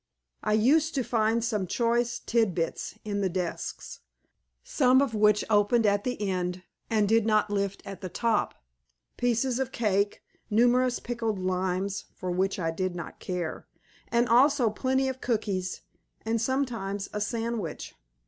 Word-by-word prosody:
I 215 - +1
used 295 +9 +3
to 265 - +1
find 225 0 +1
some 210 -5 -1
choice 235 +3 +1
tid 225 -6 +1
bits 165 -2 -3
in 205 -1 -2
the 190 - +1
desks, 180 -1 -4 0.6
some 255 +1 +4
of 275 -4 +1
which 210 -1 +3
opened 215 +2 +3
at 205 0 +2
the 250 -1 -2
end, 180 -1 -2 0.3
and 215 -2 +2
did 225 +1 +4
not 215 -1 +2
lift 200 -1 -2
at 195 0 -8
the 185 - -5
top; 230 +2 0 0.6
pieces 245 +1 +1
of 265 -1 -2
cake, 205 -4 0 0.3
numerous 245 +3 +3
pickled 230 -3 -2
limes 185 +1 -1
(for 185 -1 -4
which 190 +2 0
I 165 -3 -1
did 185 +2 -2
not 170 -2 -7
care), 180 -3 -4 0.4
and 235 +1 +2
also 250 -1 +4
plenty 265 +4 0
of 260 0 -4
cookies, 200 -6 -2 0.4
and 225 0 0
sometimes 230 -7 -1
a 210 - -2
sandwich. 225 -5 -3
215 Hz, 150 wpm, -28 LUFS, 195-240 Hz, 0.6 s, some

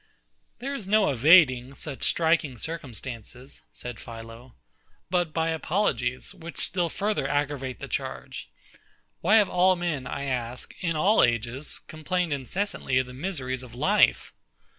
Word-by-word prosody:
There 270 +4 -4
is 225 -9 -5
no 210 -5 +4
evading 135 -2 +5
such 140 -2 -5
striking 160 -4 +2
instances, 125 - -6
said 120 -3 -8
PHILO, 115 +2 -10 0.6
but 175 -3 +1
by 165 +1 0
apologies, 155 - -1
which 170 +1 -10
still 175 -3 0
further 200 -6 -1
aggravate 140 -3 -2
the - - -6
charge. - - -5 0.7
Why 200 +6 +4
have 210 -3 +6
all 185 +1 +4
men, 165 -7 -2
I 140 - -4
ask, 125 -2 -4
in 165 -2 -1
all 195 +8 +4
ages, 120 +4 0
complained 160 +1 -2
incessantly 140 0 -1
of 130 - +2
the 125 - -11
miseries 130 -4 -3
of 125 -2 -11
life?... 190 +11 +3
145 Hz, 140 wpm, -27 LUFS, 125-175 Hz, 0.7 s, have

